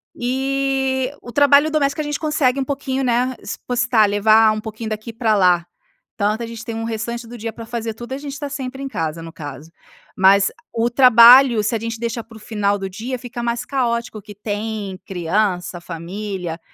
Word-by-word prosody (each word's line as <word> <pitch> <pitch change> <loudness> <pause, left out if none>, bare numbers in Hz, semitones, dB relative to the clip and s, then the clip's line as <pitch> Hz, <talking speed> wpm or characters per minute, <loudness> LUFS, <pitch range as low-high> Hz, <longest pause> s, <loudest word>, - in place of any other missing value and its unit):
E, 265 +1 -1
o 240 - -10
trabalho 285 +2 +5
doméstica, 285 -1 +1
a 300 - -4
gente 295 0 -3
consegue 285 -4 +1
um - - +1
pouquinho, 270 -1 -2
né, 250 +1 +1
espostar, 245 -3 +1
levar 215 +2 +5
um 215 - -3
pouquinho 220 0 -6
daqui 215 +2 -5
para 225 -2 +1
lá. 180 -3 +3 0.5
Tanto, 215 +2 0
a - - -3
gente 230 0 -8
tem 230 - -5
restante 230 +1 -4
do 240 +1 -10
dia 225 0 -5
para 230 - -9
fazer 230 -1 -4
tudo, 240 +3 -10
e - - -1
a - - -5
gente 280 -1 -7
tá 285 -1 -5
sempre 270 -1 -5
em 275 - -3
casa, 165 -5 -3
no 165 0 -9
caso. 150 -1 -9 0.5
Mas, 195 +1 +5 0.2
o 230 +1 +1
trabalho, 240 -1 +7
se 220 - 0
a - - -1
gente 230 0 -5
deixar 235 -1 -3
para 225 0 -16
o - - -13
final 210 -2 -1
do 195 -1 -5
dia, 235 +7 -5
fica 240 0 -7
mais 235 0 -2
caótico, 235 -4 -2
que 205 0 -12
tem 205 -1 -4
criança, 180 0 -1
família. 175 0 -5
230 Hz, 195 wpm, -20 LUFS, 205-255 Hz, 0.5 s, trabalho